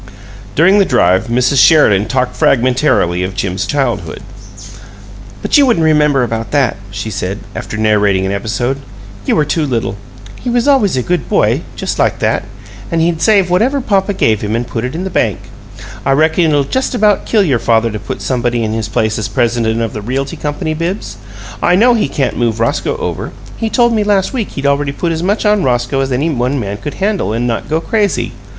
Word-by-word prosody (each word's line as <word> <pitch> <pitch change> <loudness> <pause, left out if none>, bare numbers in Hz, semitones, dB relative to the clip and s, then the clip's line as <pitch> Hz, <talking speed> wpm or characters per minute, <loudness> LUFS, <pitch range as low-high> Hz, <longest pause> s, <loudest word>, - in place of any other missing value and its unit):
During 190 +6 +5
the - - +6
drive 95 - +2
Mrs. 125 +3 +3
Sheridan 105 -11 +4
talked 125 -1 -1
fragmentarily 125 - +2
of 95 +1 -4
Jim's 95 -1 -2
childhood. 145 -2 -2 1.2
"But - - +3
you 280 - +5
wouldn't 225 -10 +2
remember 150 -4 +3
about 115 -2 -3
that," 140 -4 +1
she 100 +2 -5
said, 95 0 -3 0.2
after 110 - -5
narrating 105 -3 +2
an 95 - -1
episode. 120 +6 -2 0.5
"You - - +2
were 150 - +2
too 155 +2 0
little. 120 -7 -2 0.4
He 250 - -4
was 240 +2 +1
always 245 - +3
a 125 - 0
good 175 +5 -2
boy, - - +2
just - - -4
like - - +2
that. - - 0 0.5
And 165 - +1
he'd 165 0 0
save 200 -5 +3
whatever 250 +10 +2
papa 200 -5 0
gave 110 - +1
him, 105 +1 -2
and 120 +1 -1
put 115 -1 -4
it 125 +4 -4
in 175 - -3
the 190 - -4
bank. - - +1 0.7
I 135 - +2
reckon 160 +4 +2
it'll 145 -3 +2
just 260 - -2
about 210 -3 +2
kill 215 -3 +3
your 135 -10 +1
father 115 0 +1
to 105 - -5
put 115 +6 -6
somebody 120 -2 -1
in 110 0 -2
his 110 -1 -3
place 110 0 0
as 110 - -2
president 115 0 0
of 115 - -3
the 105 - -5
Realty 135 +5 -3
Company, 150 +1 -3
Bibbs. 165 - -4 0.4
I 180 - +3
know 240 +6 +5
he 220 -9 +1
can't 135 0 -2
move 115 -2 0
Roscoe 115 - 0
over; - - -4 0.2
he 225 - -2
told 240 0 +2
me 215 -2 +1
last 205 +2 +1
week 235 -6 -3
he'd 140 - -5
already 140 0 +1
put 170 +3 -2
as 160 0 -2
much 205 +5 0
on 210 -1 +3
Roscoe 120 -1 0
as 135 0 -1
any 145 +6 0
one 130 +1 -1
man 100 -3 -4
could 145 +6 -6
handle 200 - -1
and 115 +2 -1
not 115 -2 -3
go 155 +1 +1
crazy. 205 +3 -1
135 Hz, 205 wpm, -14 LUFS, 115-180 Hz, 1.2 s, the